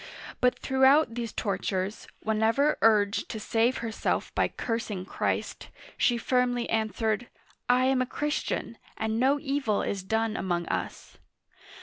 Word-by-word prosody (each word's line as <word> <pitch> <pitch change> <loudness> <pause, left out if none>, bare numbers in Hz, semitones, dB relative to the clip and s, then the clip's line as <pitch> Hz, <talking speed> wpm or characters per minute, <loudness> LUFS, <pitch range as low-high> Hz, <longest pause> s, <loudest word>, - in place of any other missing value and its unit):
But 250 0 +3
throughout 265 0 +4
these 230 -2 -4
tortures, 195 0 -2
whenever 225 +7 +2
urged 210 -2 +3
to 220 - -4
save, 230 +4 +1
herself 225 -1 -2
by - - +2
cursing 225 -5 -3
Christ, - - -3 0.3
she 240 - +2
firmly 245 0 +1
answered: 220 +1 0 0.4
I 250 +1 +4
am 260 -1 +2
a 255 - -1
Christian, 295 -5 -3 0.2
and 220 0 -1
no 275 +3 +3
evil 275 -7 0
is 195 - -2
done 220 +3 -1
among 175 -4 -1
us." - - -4
225 Hz, 130 wpm, -28 LUFS, 215-255 Hz, 0.4 s, throughout